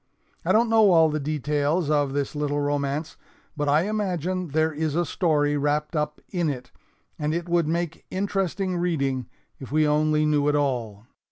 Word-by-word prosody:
I - - +1
don't 230 +2 +4
know 220 -2 +5
all 160 -1 +6
the 155 - -1
details 150 +2 0
of 145 -2 +2
this 140 -1 -2
little 145 -1 -1
romance, 145 +2 -2 0.4
but 145 -1 -1
I 150 +3 +4
imagine 185 -3 -2
there 155 +1 +1
is 155 0 -2
a 175 +1 +1
story 150 -3 +1
wrapped 150 +3 -1
up 150 0 -2
in 175 -4 0
it, 130 -3 -6 0.5
and 150 +1 -1
it 170 0 -3
would 170 -2 +2
make 170 0 -2
interesting 190 -1 -1
reading 140 -8 -1 0.3
if 135 -3 -9
we 155 0 +3
only 155 +1 +2
knew 150 -1 +2
it 150 - +2
all. 120 -7 -1
150 Hz, 175 wpm, -25 LUFS, 145-175 Hz, 0.5 s, all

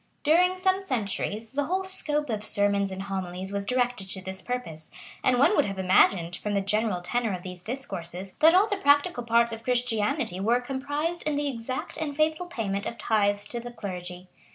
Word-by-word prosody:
During 360 +5 +4
some 375 +1 +2
centuries, 220 - -2
the 285 +1 -1
whole 375 +4 -1
scope 300 -7 +1
of 210 -1 -2
sermons 200 -1 +2
and 190 0 -5
homilies 190 -1 -4
was 200 0 -2
directed 245 -6 0
to 190 - -2
this 190 +1 -6
purpose; 205 -12 -5 0.3
and 255 -1 +3
one 290 +11 +5
would - - +4
have 195 -1 -4
imagined, 185 -2 +3
from 210 -1 -3
the 200 - +2
general 210 -1 0
tenor 225 +4 0
of 180 - -9
these 180 -1 -8
discourses, 190 -7 -5
that 325 +3 +7
all 385 +3 +6
the 410 - -1
practical 285 -2 +3
parts 235 0 +3
of 225 0 -7
Christianity 245 - 0
were 230 +5 +2
comprised 290 +6 -2
in 300 - +1
the 290 0 0
exact 255 0 -4
and 295 -3 -3
faithful 315 +3 +1
payment 200 - -3
of 230 - -5
tithes 205 -2 +1
to 240 - -3
the 240 +1 -7
clergy. 180 -4 -7
230 Hz, 195 wpm, -27 LUFS, 195-285 Hz, 0.3 s, that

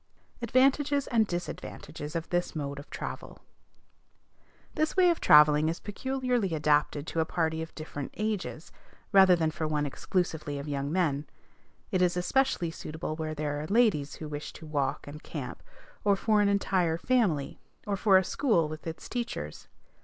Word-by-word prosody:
ADVANTAGES 275 +4 +3
AND 225 -3 +2
DISADVANTAGES 175 -3 -6
OF 165 -1 -2
THIS 175 -1 -1
MODE 140 -2 -4
OF 140 - -12
TRAVEL. - - -6 1.4
This 310 +3 -1
way 360 -2 +6
of 335 - -2
travelling 150 +1 +6
is 165 - -3
peculiarly 245 -4 -1
adapted 150 -1 +1
to 165 - -3
a 160 - +2
party 160 -1 -1
of 160 - -8
different 145 -3 -6
ages, 210 -6 -3 0.4
rather 190 -3 +7
than 160 -2 0
for 160 0 -3
one 150 -1 0
exclusively 155 -1 -2
of 140 +1 -6
young 140 0 -2
men. 155 -5 0 0.6
It 185 -3 +1
is 180 -1 +2
especially 180 -2 +1
suitable 160 -1 -5
where 155 -1 -4
there 145 -1 -2
are 155 - -5
ladies 200 -10 +2
who 155 - -7
wish 150 0 -6
to 160 - -11
walk 145 -3 -1
and 150 +1 -9
camp, - - -6 0.4
or 205 -1 +4
for 210 +1 +2
an 205 - +3
entire 185 -4 +1
family, 180 - +1 0.3
or 205 - -1
for 195 0 +5
a 190 - +3
school 180 - +1
with 155 +2 -8
its 165 - -6
teachers. 235 - -5
165 Hz, 165 wpm, -29 LUFS, 150-210 Hz, 1.4 s, rather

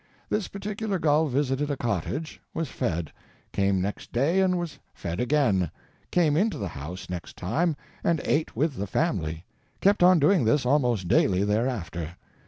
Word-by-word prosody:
This 210 -2 0
particular 205 0 -3
gull 155 -1 +3
visited 140 +1 0
a 145 - -1
cottage; 120 - -3
was 165 -1 -2
fed; 85 - -2 0.4
came 100 -1 +2
next 100 +3 -4
day 145 +10 +2
and 185 -1 +3
was 175 -3 -4 0.2
fed 85 +2 -4
again; 125 - +2 0.4
came 160 -5 +3
into 205 +6 +2
the 100 -3 -3
house, 80 +6 -7
next 90 -2 -6
time, 150 - 0 0.3
and 170 -2 +2
ate 155 +1 0
with 140 +2 0
the 100 - -2
family; 85 - -1 0.3
kept 200 0 +3
on 180 0 +7
doing 155 +1 +4
this 125 +5 +2
almost 125 -8 +2
daily, 95 +1 +3
thereafter. 100 -7 -1
130 Hz, 160 wpm, -26 LUFS, -, 0.4 s, on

